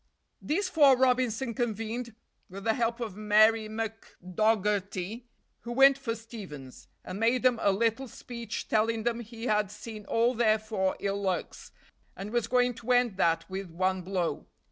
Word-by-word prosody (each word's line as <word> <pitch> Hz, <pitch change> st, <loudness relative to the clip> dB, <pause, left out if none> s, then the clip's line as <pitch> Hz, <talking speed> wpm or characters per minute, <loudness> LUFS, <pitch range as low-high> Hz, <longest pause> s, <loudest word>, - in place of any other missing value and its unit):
These 370 Hz, +6 st, -1 dB
four 290 Hz, -7 st, +5 dB
Robinson 250 Hz, -1 st, +1 dB
convened, 225 Hz, 0 st, -3 dB, 0.3 s
with 195 Hz, +1 st, -9 dB
the 225 Hz, -, +2 dB
help 235 Hz, 0 st, -1 dB
of 220 Hz, -6 st, -5 dB
Mary 215 Hz, +1 st, +4 dB
McDogherty, 210 Hz, -1 st, -2 dB, 0.3 s
who 240 Hz, -, -8 dB
went 270 Hz, +2 st, +7 dB
for 260 Hz, -4 st, -4 dB
Stevens; 195 Hz, -, -10 dB, 0.2 s
and 185 Hz, +2 st, -6 dB
made 235 Hz, +3 st, +2 dB
them 250 Hz, -3 st, +3 dB
a 200 Hz, -, +4 dB
little 230 Hz, +6 st, 0 dB
speech, 235 Hz, -2 st, -7 dB
telling 220 Hz, +1 st, +1 dB
them 235 Hz, 0 st, 0 dB
he 230 Hz, 0 st, -8 dB
had 210 Hz, -3 st, +1 dB
seen 210 Hz, 0 st, -9 dB
all 235 Hz, +2 st, +2 dB
their 220 Hz, -2 st, +3 dB
four 210 Hz, -3 st, -2 dB
ill 200 Hz, 0 st, -1 dB
lucks, 185 Hz, -3 st, -3 dB, 0.5 s
and 195 Hz, +3 st, -6 dB
was 240 Hz, -2 st, 0 dB
going 245 Hz, 0 st, +2 dB
to 240 Hz, +2 st, -2 dB
end 245 Hz, -5 st, +3 dB
that 165 Hz, -2 st, +1 dB
with 190 Hz, -1 st, -6 dB
one 185 Hz, +2 st, -1 dB
blow. 180 Hz, -1 st, -2 dB
225 Hz, 160 wpm, -29 LUFS, 200-240 Hz, 0.5 s, went